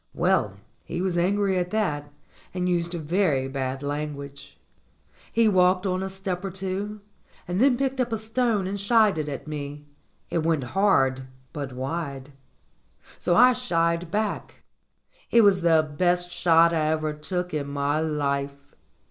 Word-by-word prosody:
Well, 165 - +1 0.3
he 170 - -5
was 185 -1 -1
angry 190 +2 +1
at 180 0 -2
that, 150 -9 -2 0.4
and 180 0 -1
used 175 -1 0
very 160 -4 0
bad 135 0 -4
lan 145 +1 -3
guage. 140 0 -11 0.7
He 230 -1 +3
walked 185 -1 +3
on 185 -1 0
a 190 - -3
step 190 -1 -4
or 195 - -3
two, 195 +3 -4 0.5
and 180 +4 -1
then 265 -2 +4
picked 270 0 -1
up 245 -1 -2
a 225 - 0
stone 220 -2 0
and 200 +2 -3
shied 210 -3 +3
it 150 -1 -3
at 140 +1 -6
me. 145 -1 -6 0.5
It 170 - +1
went 160 -3 0
hard, 135 -10 +2 0.3
but 140 -4 -5
wide. 140 +1 -5 0.9
So 175 - +1
I 250 +2 +7
shied 170 -8 0
back. 210 +2 -3 0.7
It 235 - +5
was 200 -3 +4
the 165 -2 +4
best 175 +1 +1
shot 170 -1 +4
I 155 -2 +1
ever 155 -1 0
took 180 +4 -4
in 145 -2 -2
my 140 +1 -1
life. 140 -2 -2
175 Hz, 155 wpm, -25 LUFS, 145-195 Hz, 0.9 s, I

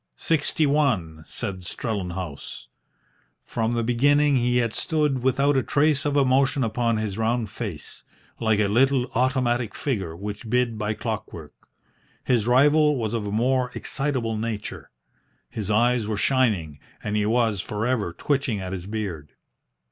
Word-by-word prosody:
"Sixty 155 0 +1
one," 115 - 0
said 95 -1 -5
Strellenhaus. 90 - -5 0.8
From 115 +1 -1
the 115 - 0
beginning 145 +5 +3
he 125 0 +2
had 115 -2 +1
stood 150 -6 0
without 140 +3 +2
a 135 - +3
trace 145 0 +1
of 145 0 0
emotion 135 +1 +3
upon 115 0 0
his 110 -1 -3
round 115 -1 0
face, 105 -10 -7 0.4
like 110 -2 +2
a 105 - +3
little 125 +4 +2
automatic 125 -2 +1
figure 95 - -2
which 105 +4 -6
bid 120 -2 +1
by 105 0 -1
clockwork. 110 -1 -5 0.7
His 120 -3 +1
rival 150 +4 +5
was 115 -4 -2
of 110 -3 -2
a - - -3
more 125 +3 +1
excitable 130 -6 -2
nature. 110 -1 -5 0.6
His 110 -4 -4
eyes 120 +1 +2
were 110 -1 -2
shining, 105 - +1 0.2
and 105 - -2
he 105 0 +1
was 110 -4 +1
for 105 +2 -3
ever 120 -8 0
twitching 135 - -1
at 95 0 -5
his 90 -1 -6
beard. 95 -9 -5
115 Hz, 150 wpm, -24 LUFS, 105-130 Hz, 0.8 s, rival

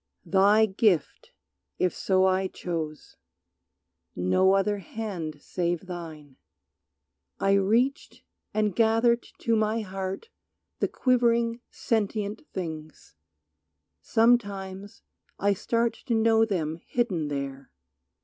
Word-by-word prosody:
Thy 200 +5 +5
gift, 190 -5 0 0.5
if 185 - +1
so 190 -1 +2
I 190 0 +2
chose, 160 -5 -6 1.0
no 185 - +3
other 200 +1 +1
hand 180 -6 -5
Save 175 +1 -2
thine. 160 -6 -9 1.0
I 195 - +2
reached 225 +8 +1 0.3
and 210 -3 0
gathered 230 +1 +3 0.2
to 230 - +2
my 220 +1 +1
heart 195 - -5 0.5
The - - +1
quivering, 235 -2 +1
sentient 210 -2 -2
things. 160 -4 -7 0.9
Sometimes 200 - 0 0.3
I 200 +1 +2
start 230 +3 0
To 235 - +1
know 225 0 +4
them 165 -6 -2
hidden 195 -11 -1
there. 140 -1 -5
195 Hz, 100 wpm, -27 LUFS, 175-225 Hz, 1.0 s, Thy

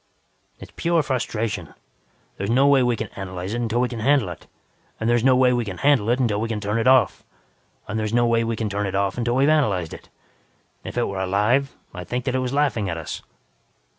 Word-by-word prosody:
"It's - - -11
pure 170 -2 +1
frustration. 110 - -3 0.6
There's 100 +2 -3
no 130 +4 +4
way 140 -2 +5
we 125 -1 +2
can 110 -1 -5
analyze 95 0 -6
it 120 - -2
until 120 +1 0
we 125 - +2
can 120 -2 -6
handle 130 -3 +2
it, 85 - -10 0.5
and 115 +1 +1
no 130 0 +5
way 125 -1 +4
we 120 -1 0
can 95 -5 -6
handle 140 -7 +2
it 120 - +3
until 110 -5 +1
we 115 - -1
can 110 -2 -2
turn 105 +2 -1
it 115 - 0
off. 130 -5 +4 0.6
And 110 +1 -2
there's 110 -1 -2
no 120 +1 +3
way 115 0 +2
we 115 0 -1
can 110 -1 -2
turn 100 0 -2
it 95 - -4
off 100 -1 0
until 120 0 0
we 135 - +3
have 150 - +4
analyzed 95 - 0
it. - - -12 0.7
If - - -7
it 120 - +2
were 100 -1 -4
alive, 105 +9 +1 0.2
I'd 90 -1 -8
think 125 +3 -3
that 130 - -1
it 130 - +1
was 130 -1 -2
laughing 135 -9 0
at 85 - -3
us. 80 -4 -6
115 Hz, 230 wpm, -23 LUFS, 100-125 Hz, 0.7 s, way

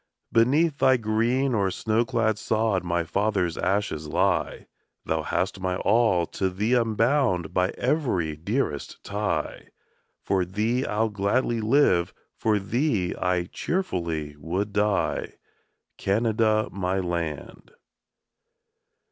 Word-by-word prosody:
Beneath 140 +7 +3
thy 130 -1 +5
green 120 +4 +1
or 100 -4 +1
snow 110 +5 0
clad 115 -4 0
sod 110 -4 0
My 85 -1 0
fathers' 95 0 0
ashes 95 -5 -1
lie; - - 0 0.4
Thou 80 0 0
hast 95 +5 -2
my 95 -1 -1
all, 100 -4 +2
to 95 +3 -2
thee 105 +6 -1
I'm 115 -3 +2
bound 115 - +1
By 90 0 +2
every 120 - 0
dearest 85 - -2
tie; 105 +1 -3 0.6
For 95 -2 +1
thee 110 +8 -1
I'll 110 +2 0
gladly 110 +3 0
live, 110 -7 +3 0.2
for 110 -1 +1
thee 105 - 0
I 90 -1 0
cheerfully 85 - -3
would 90 +7 -3
die, 105 -2 0 0.7
Canada, 110 +1 +1
my 95 -1 -1
land. 85 -5 -4
105 Hz, 115 wpm, -25 LUFS, 90-115 Hz, 0.7 s, thy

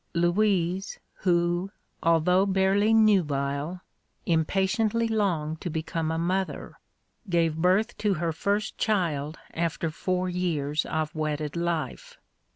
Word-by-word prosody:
Louise, 180 +1 +1 0.2
who, 175 +1 +1 0.3
although 165 +3 +3
barely 195 +2 +2
nubile, 165 -7 +2 0.4
impatiently 195 +7 +1
longed 170 -8 -1
to 175 - -3
become 160 0 -2
a 160 - -1
mother, 185 +3 -2 0.5
gave 165 -3 +2
birth 185 +8 +2
to 205 -3 +1
her 170 0 -1
first 200 +5 -1
child 160 -8 0 0.2
after 165 -1 -1
four 185 +3 -1
years 155 -5 -1
of 155 -1 -2
wedded 150 -1 -2
life. 170 - -3
175 Hz, 110 wpm, -27 LUFS, 160-195 Hz, 0.5 s, although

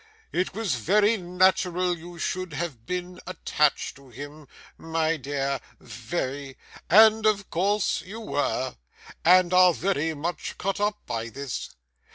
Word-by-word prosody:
It 185 +1 -1
was 215 -8 -1
very 205 - +3
natural 180 -1 +2
you 170 +1 -11
should 185 0 -3
have 145 -7 -5
been 180 0 -4
attached 150 -5 0
to 140 -1 -17
him, 145 +4 -10 0.3
my 165 0 -1
dear 140 -1 -2 0.2
very 140 -5 -5 0.3
and 220 +3 +7
of 200 -2 0
course 200 +4 +1
you 210 +5 -9
were, 145 - -2 0.5
and 180 +1 +5
are 180 -2 +6
very 160 -4 0
much 160 +3 -4
cut 195 +2 -2
up 210 0 -1
by 115 0 -3
this. 140 +3 -5
175 Hz, 135 wpm, -26 LUFS, 145-185 Hz, 0.5 s, and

